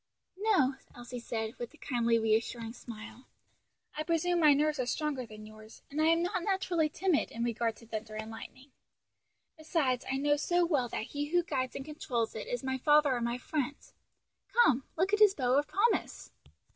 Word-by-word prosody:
"No," 360 -12 +3 0.2
Elsie 245 0 -7
said, 225 -1 -3
with 240 +5 -6
a - - -20
kindly 235 -4 +1
reassuring 225 +1 0
smile, 230 +1 -10 0.7
"I 305 - -2
presume 335 +2 +1
my 305 -3 +7
nerves 300 0 +1
are 250 - 0
stronger 280 -4 -2
than 215 -1 -11
yours, 215 +1 -14
and 300 +2 -1
I - - +4
am 330 +1 +4
not 365 +1 -1
naturally 355 -4 +1
timid 335 0 +1
in 230 - -4
regard 230 -1 0
to 230 - -16
thunder 220 -1 -6
and 220 +1 -5
lightning. 260 +4 -11 0.9
Besides, 295 -6 0
I 265 - 0
know 290 +1 +2
so 350 +4 +2
well 280 -8 +1
that - - -3
he 290 0 -2
who 350 +3 +2
guides 260 -6 -2
and 270 - -5
controls 245 -7 -2
it 220 - -6
is 245 0 -3
my 260 0 -2
Father 295 -1 +4
and 240 -1 -1
my 235 +1 -1
Friend. 285 +1 -2 0.7
Come, 295 - +3
look 380 +5 +1
at 420 - +4
his 415 -2 +6
bow 255 -2 +2
of 295 - -2
promise." 435 +4 0
270 Hz, 190 wpm, -31 LUFS, 235-315 Hz, 0.9 s, my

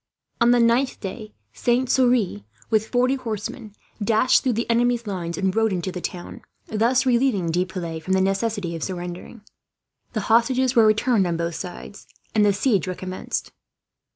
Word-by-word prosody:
On 235 - +5
the 245 0 +5
ninth 235 +3 +2
day 215 +2 -7 0.2
Saint 250 +1 +1
Surin, 245 - +2 0.3
with 220 0 +2
forty 250 +2 +2
horsemen, 230 -3 -5 0.3
dashed 220 +4 +3
through 255 - 0
the 230 +2 -2
enemy's 235 0 +1
lines 175 -5 -4
and 190 -1 0
rode 225 -1 +2
into 185 0 -2
the 180 - -6
town; 175 0 -6 0.2
thus 235 +5 +1
relieving 240 -9 +2
De 175 +2 +1
Piles 170 -4 -5
from 185 +4 -2
the 190 - +3
necessity 195 -2 -1
of 165 - -6
surrendering. 180 +5 -6 0.7
The 215 - -1
hostages 240 +4 +2
were 225 -2 +6
returned 215 -2 +2
on 170 -1 -1
both 170 0 -2
sides, 180 +4 -8 0.3
and 215 - +3
the 205 - +5
siege 200 -2 +1
recommenced. 185 0 -4
215 Hz, 165 wpm, -23 LUFS, 185-240 Hz, 0.7 s, were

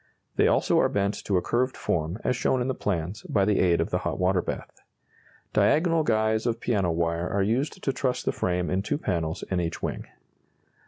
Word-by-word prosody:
They - - +4
also - - +3
are - - +3
bent 100 +1 -1
to 100 - +2
a 90 - 0
curved 130 +2 0
form, 80 +3 -1
as 125 - +1
shown 125 +2 +1
in 125 - -1
the 130 - 0
plans, 95 -2 -3
by 100 -2 +2
the 105 0 +2
aid 85 -2 +3
of - - -1
the - - +1
hot - - -3
water 90 0 +2
bath. - - -6 0.7
Diagonal 165 +1 +3
guys 110 -3 +1
of 115 -1 -1
piano 100 -8 0
wire 85 +1 -1
are 100 0 +1
used 120 +9 -1
to 135 - 0
truss 130 -2 -1
the - - +1
frame 90 -1 -1
in 95 +1 +1
two 100 - -1
panels 85 - -2
in 90 - +1
each 85 -1 -4
wing. - - -3
100 Hz, 210 wpm, -26 LUFS, 90-120 Hz, 0.7 s, They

